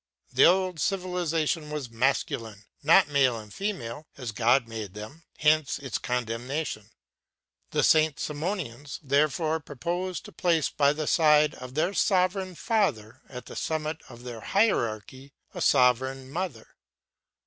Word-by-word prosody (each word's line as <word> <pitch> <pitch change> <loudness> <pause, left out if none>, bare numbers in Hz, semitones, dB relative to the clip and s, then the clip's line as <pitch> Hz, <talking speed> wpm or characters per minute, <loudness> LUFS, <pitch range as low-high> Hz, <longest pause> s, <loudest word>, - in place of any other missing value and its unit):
The 130 - +6
old 185 -1 +3
civilization 170 -4 -1
was 145 -5 -5
masculine, 115 -3 -1 0.2
not 165 +6 +5
male 135 -5 +2
and 105 -2 -10
female 155 - -4
as 125 -4 -5
God 120 +3 +2
made 110 -4 -7
man. 110 +10 -9 0.2
Hence 155 -2 +2
its 135 -4 -4
condemnation. 125 -1 -3 0.8
The - - 0
Saint 155 -2 +4
Simonians, 145 - -4
therefore, 155 +3 +1
proposed 175 +6 -4
to - - -10
place 165 -4 +1
by 140 -1 +3
the 155 +1 -3
side 150 -1 +4
of 130 0 -10
their 170 +5 +1
sovereign 185 -1 +1
Father 130 - -1
at 125 -1 -8
the - - -10
summit 155 0 -3
of 120 -1 -12
their 120 -3 -7
hierarchy 130 - 0 0.2
a - - -6
sovereign 130 0 +2
Mother. 165 -10 -5
145 Hz, 135 wpm, -27 LUFS, 125-165 Hz, 0.8 s, The